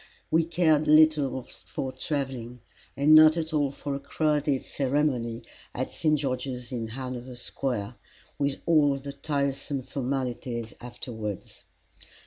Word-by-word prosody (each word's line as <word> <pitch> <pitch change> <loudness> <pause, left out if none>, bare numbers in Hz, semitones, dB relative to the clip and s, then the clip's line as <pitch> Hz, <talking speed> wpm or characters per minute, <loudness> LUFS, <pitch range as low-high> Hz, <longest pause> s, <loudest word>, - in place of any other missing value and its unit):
We 165 0 +4
cared 160 -2 +2
little 150 -4 +5
for 130 +2 -6
travelling, 130 -3 -3 0.4
and 145 +2 +5
not 155 +1 +8
at 160 -1 -2
all 145 -2 +2
for 140 +1 -5
a 140 - -3
crowded 150 -1 0
ceremony 130 -4 0 0.3
at 130 - -2
St 155 -2 +2
George's 125 -3 -3
in 115 -3 -3
Hanover 125 +1 -6
Square, 120 -2 -2 0.4
with 140 -1 -1
all 150 -4 +4
the 140 +1 -6
tiresome 140 -1 -2
formalities 125 -3 -3
afterwards. 110 -4 -7
135 Hz, 120 wpm, -27 LUFS, 125-150 Hz, 0.4 s, not